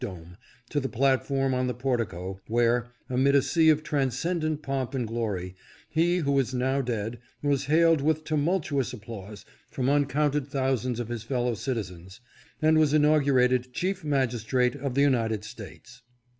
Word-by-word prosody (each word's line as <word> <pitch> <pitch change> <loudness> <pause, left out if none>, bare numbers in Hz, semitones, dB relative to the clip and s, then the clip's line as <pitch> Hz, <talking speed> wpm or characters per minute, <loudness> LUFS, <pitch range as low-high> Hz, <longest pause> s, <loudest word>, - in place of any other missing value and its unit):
dome, 90 -6 -8 0.3
to 145 - -1
the 135 -1 -3
platform 135 +1 +1
on 125 0 0
the 125 - -2
portico, 110 -7 -3
where, 120 +1 +2 0.2
amid 130 +2 +2
a 140 - +6
sea 160 -2 +3
of 155 0 +3
transcendent 155 +3 -1
pomp 135 -1 -2
and 125 -3 -1
glory, 105 -6 -3 0.4
he 170 +3 +2
who 140 -5 +1
is 130 -1 -1
now 130 +2 +1
dead 115 -2 -3 0.2
was 140 -2 +1
hailed 165 +1 +4
with 155 +1 +1
tumultuous 155 -3 0
applause 105 -3 -9 0.2
from 130 0 -1
uncounted 145 0 +1
thou 135 -1 0
sands 125 0 -3
of 120 -1 -4
his 120 -2 -4
fellow 120 +1 -1
citizens, 100 -5 -5 0.4
and 155 0 +5
was 155 -1 +3
inaugurated 130 -4 +3
Chief 185 0 -2
Magistrate 125 -3 +1
of 140 -2 -4
the 140 - +3
United 115 -6 +1
States. 110 +2 -11
130 Hz, 155 wpm, -27 LUFS, 115-145 Hz, 0.4 s, a